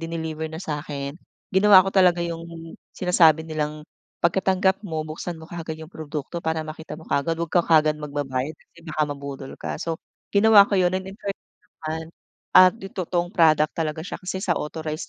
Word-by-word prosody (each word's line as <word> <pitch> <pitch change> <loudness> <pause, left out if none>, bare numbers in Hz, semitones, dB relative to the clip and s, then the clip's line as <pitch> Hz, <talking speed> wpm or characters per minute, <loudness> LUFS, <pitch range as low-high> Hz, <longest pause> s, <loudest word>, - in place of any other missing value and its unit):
dineliver 160 -1 -4
na 160 - -7
sa'kin, 145 -4 -4 0.4
ginawa 190 0 +8
ko - - -1
talaga 180 -3 +5
'yung 170 -1 -3 0.5
sinasabi 165 -3 +3
nilang, 155 -1 -3 0.4
"Pagkatanggap 190 +2 +2
mo 160 -5 -3
buksan 165 +2 -5
mo 160 - -12
kaagad 165 -2 -6
'yung 160 - -9
produkto, 155 +2 -6
para 160 0 0
makita 155 +1 -8
mo 160 - -14
kaagad, 165 +4 0
'wag 170 - -2
ka 175 - +4
kaagad 155 -2 +4
magbabayad 145 -2 -3
kasi 170 - -21
baka 155 -2 -1
mabudol 140 -1 -7
ka." - - -5
So 165 -1 -2 0.4
ginawa 205 -1 +7
ko 200 - +1
'yun 180 -1 +3
at 185 0 -2
in 195 - -10
fairness 200 -2 -8 0.2
naman 160 +1 -3 0.5
at 185 0 +8
'yung 195 - -8
totoong 175 -1 -1
product 155 -2 +4
talaga 155 -1 -2
siya, - - -6
kasi 190 +1 -4
sa 180 - +2
authorized 155 0 -5
160 Hz, 180 wpm, -24 LUFS, 155-180 Hz, 0.5 s, ginawa